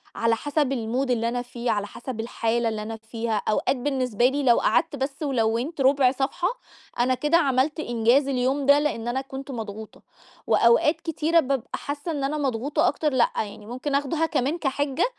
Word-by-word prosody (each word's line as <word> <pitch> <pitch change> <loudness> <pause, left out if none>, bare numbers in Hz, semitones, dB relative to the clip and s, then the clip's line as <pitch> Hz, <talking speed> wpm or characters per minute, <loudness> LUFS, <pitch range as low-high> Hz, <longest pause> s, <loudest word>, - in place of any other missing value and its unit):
على 230 0 +2
حسب 290 +1 0
الmood 250 +2 -1
اللي 230 -1 +1
أنا 245 +1 -2
فيه، 245 -1 -3
على 205 -1 -1
حسب 240 +1 -7
الحالة 230 0 -1
اللي 220 -1 -4
أنا 225 +1 -6
فيها. 225 0 -3
أوقات 255 +5 +1
بالنسبة 250 -4 0
لي 280 +3 +1
لو 240 -3 +5
قعدت 325 -2 +1
بس 275 +2 -4
ولوّنت 255 +3 0
رُبع 265 -1 +4
صفحة 275 +7 -1 0.5
أنا 250 +2 +3
كده 295 +6 +2
عملت 280 0 +1
إنجاز 240 +1 +2
اليوم 270 +1 0
ده 285 +1 +6
لأن 265 -6 -2
أنا 250 +2 -1
كنت 270 +1 -8
مضغوطة. 220 -3 -7 0.5
وأوقات 235 +7 +4
كتيرة 325 0 +1
بابقى 270 -5 -1
حاسة 290 +4 -5
إن 290 -3 -3
أنا 295 +3 -1
مضغوطة 275 0 0
أكتر، 300 0 0
لأ 250 -2 +3
يعني 210 0 -4
ممكن 255 +5 -3
آخدها 290 +3 0
كمان 300 0 -1
كحِجَّة 285 0 0
260 Hz, 180 wpm, -25 LUFS, 235-285 Hz, 0.5 s, ده